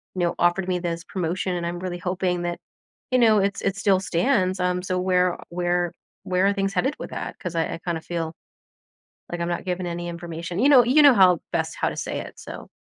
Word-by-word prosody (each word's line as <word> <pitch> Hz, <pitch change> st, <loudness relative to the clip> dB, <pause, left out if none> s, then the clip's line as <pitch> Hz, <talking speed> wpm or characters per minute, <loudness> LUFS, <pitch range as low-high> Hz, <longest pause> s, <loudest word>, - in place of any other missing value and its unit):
you 185 Hz, -, -4 dB
know, 170 Hz, -, +1 dB
offered 175 Hz, +2 st, +2 dB
me 180 Hz, -1 st, 0 dB
this 170 Hz, -1 st, -3 dB
promotion, 180 Hz, 0 st, -2 dB
and 170 Hz, -, -3 dB
I'm 175 Hz, 0 st, -4 dB
really 180 Hz, -1 st, -4 dB
hoping 180 Hz, 0 st, -1 dB
that, 175 Hz, 0 st, -3 dB, 0.5 s
you 255 Hz, -, +4 dB
know, 220 Hz, -3 st, +5 dB
it 200 Hz, 0 st, +1 dB
s -, -, -5 dB
it 195 Hz, -, 0 dB
still 200 Hz, -1 st, +3 dB
stands. 185 Hz, 0 st, +1 dB
Um, 180 Hz, 0 st, 0 dB
so 185 Hz, 0 st, -2 dB
where 180 Hz, -1 st, +2 dB
where 175 Hz, 0 st, 0 dB, 0.3 s
where 185 Hz, +1 st, +2 dB
are 200 Hz, -, +3 dB
things 195 Hz, 0 st, -1 dB
headed 265 Hz, +10 st, 0 dB
with -, -, -7 dB
that? -, -, -5 dB
'Cause 180 Hz, -3 st, -5 dB
I 165 Hz, -, 0 dB
I -, -, -7 dB
kinda 170 Hz, -2 st, -2 dB
feel, 165 Hz, -1 st, -4 dB, 1.0 s
like, 175 Hz, -, -4 dB
I'm 170 Hz, -, -1 dB
not 175 Hz, -, -3 dB
given 180 Hz, -1 st, -2 dB
any 175 Hz, 0 st, -4 dB
information." 170 Hz, +1 st, -6 dB
You 275 Hz, -, +5 dB
know 255 Hz, -5 st, +7 dB
you 275 Hz, +6 st, +5 dB
know 285 Hz, -3 st, +8 dB
how 185 Hz, -5 st, +5 dB
best -, -, -1 dB
how -, -, 0 dB
to -, -, -7 dB
say -, -, -3 dB
it. -, -, -10 dB
So -, -, -9 dB
180 Hz, 235 wpm, -24 LUFS, 175-195 Hz, 1.0 s, know